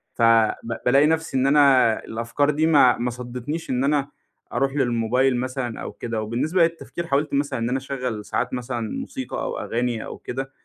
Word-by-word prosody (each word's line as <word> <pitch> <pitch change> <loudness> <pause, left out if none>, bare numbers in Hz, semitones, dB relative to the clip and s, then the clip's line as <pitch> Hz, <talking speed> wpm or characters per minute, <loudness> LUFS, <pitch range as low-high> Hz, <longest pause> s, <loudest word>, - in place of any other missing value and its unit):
ف - - -5
ب 115 0 +3
بالاقي 140 +4 +5
نَفسي 160 -3 0
إن 130 - +2
أنا 140 -5 +5
الأفكار 115 +6 -1
دي 155 +2 +2
ما 135 -6 +5
ما 120 +1 -1
صدتنيش 125 +6 -6
إن 130 0 0
أنا 140 0 +1 0.4
أروح 135 +2 0
للموبايل 125 0 +1
مثلًا 130 -2 -4
أو - - -5
كده، 115 -2 -4
وبالنسبة 140 - +1
للتفكير 170 +1 -3
حاولت 145 +1 0
مثلًا 140 -3 0
إن 115 +1 -1
أنا 130 - 0
اشغّل 125 -5 -4
ساعات - - -2
مثلًا 120 -3 -3
موسيقى - - -5
أو - - -3
أغاني 120 -1 -2
أو - - -7
كده 135 +2 -5
130 Hz, 180 wpm, -23 LUFS, 120-140 Hz, 0.4 s, بالاقي